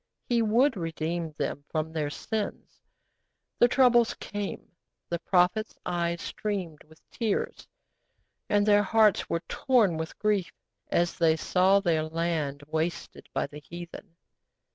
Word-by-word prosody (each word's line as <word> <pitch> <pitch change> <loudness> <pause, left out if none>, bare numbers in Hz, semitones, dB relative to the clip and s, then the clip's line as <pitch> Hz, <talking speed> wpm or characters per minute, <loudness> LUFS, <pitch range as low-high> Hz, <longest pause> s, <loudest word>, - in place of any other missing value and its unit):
He 240 -2 +2
would 230 +5 +3
redeem 165 -1 -3
them 145 -1 -3
from 160 0 -2
their 150 -2 -1
sins. 215 +7 -5 0.8
The 240 - +7
troubles 245 -2 +4
came, 205 -1 -5 0.4
the 170 - -2
prophets' 185 +5 +2
eyes 170 -1 -1
streamed 185 -8 -4
with 160 +1 -22
tears, 225 -4 -2 0.8
and 205 -1 +3
their 205 -1 +5
hearts 215 0 +3
were 170 - 0
torn 220 -11 +2
with 160 0 -5
grief 205 -4 0 0.4
as 175 0 +1
they 160 -2 +4
saw 190 +4 +3
their 170 -5 +2
land 155 -3 -2
wasted 160 +2 -3
by - - -1
the 150 - -10
heathen. 175 +3 -10
175 Hz, 130 wpm, -28 LUFS, 160-210 Hz, 0.8 s, The